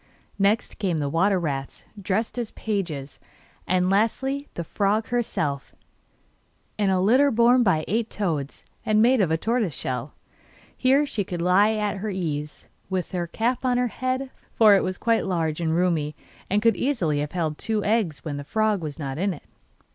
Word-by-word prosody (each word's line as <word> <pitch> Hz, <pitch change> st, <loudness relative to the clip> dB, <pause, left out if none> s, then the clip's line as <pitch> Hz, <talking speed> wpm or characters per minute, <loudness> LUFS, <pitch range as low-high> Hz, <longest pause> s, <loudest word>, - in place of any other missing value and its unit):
Next 205 Hz, +4 st, +1 dB
came 185 Hz, -6 st, 0 dB
the 145 Hz, -2 st, -1 dB
water 190 Hz, +4 st, +2 dB
rats, 135 Hz, -5 st, -4 dB, 0.2 s
dressed 210 Hz, +5 st, -1 dB
as 235 Hz, -3 st, -3 dB
pages, 170 Hz, -10 st, -4 dB, 0.5 s
and 180 Hz, 0 st, +2 dB
lastly 265 Hz, +8 st, 0 dB
the 170 Hz, -, -3 dB
frog 205 Hz, +6 st, 0 dB
herself, 155 Hz, -, -2 dB, 1.0 s
in 205 Hz, -2 st, +1 dB
a 190 Hz, -1 st, +2 dB
litter 255 Hz, +9 st, +4 dB
borne 240 Hz, +1 st, +4 dB
by 180 Hz, -9 st, +2 dB
eight 225 Hz, +2 st, 0 dB
toads, 155 Hz, -9 st, -3 dB, 0.2 s
and 215 Hz, 0 st, +2 dB
made 240 Hz, +1 st, +5 dB
of 185 Hz, -, +2 dB
tortoiseshell. 165 Hz, -, -2 dB, 0.6 s
Here 270 Hz, +3 st, +3 dB
she 215 Hz, -7 st, -2 dB
could 180 Hz, -2 st, -5 dB
lie 185 Hz, +5 st, +4 dB
at 210 Hz, -1 st, -1 dB
her 215 Hz, +3 st, -3 dB
ease, 150 Hz, -6 st, -4 dB, 0.2 s
with 185 Hz, -2 st, -2 dB
her 175 Hz, -2 st, -2 dB
cap 235 Hz, +9 st, -1 dB
on 250 Hz, -1 st, +2 dB
her 250 Hz, -1 st, +1 dB
head, 255 Hz, +4 st, -3 dB, 0.2 s
for 215 Hz, -2 st, +7 dB
it 195 Hz, -, +3 dB
was 185 Hz, 0 st, -3 dB
quite 230 Hz, -3 st, +1 dB
large 165 Hz, -3 st, -1 dB
and 160 Hz, -1 st, 0 dB
roomy, 165 Hz, -4 st, 0 dB, 0.3 s
and 205 Hz, +2 st, +1 dB
could 230 Hz, -1 st, +4 dB
easily 180 Hz, -, 0 dB
have 145 Hz, 0 st, -3 dB
held 160 Hz, -4 st, -2 dB
two 215 Hz, -2 st, -1 dB
eggs 205 Hz, -10 st, 0 dB
when 145 Hz, -2 st, -3 dB
the 145 Hz, -, -5 dB
frog 215 Hz, +4 st, 0 dB
was 150 Hz, -3 st, -5 dB
not 140 Hz, -2 st, -4 dB
in 195 Hz, -1 st, 0 dB
it. -, -, -15 dB
195 Hz, 175 wpm, -24 LUFS, 165-225 Hz, 1.0 s, for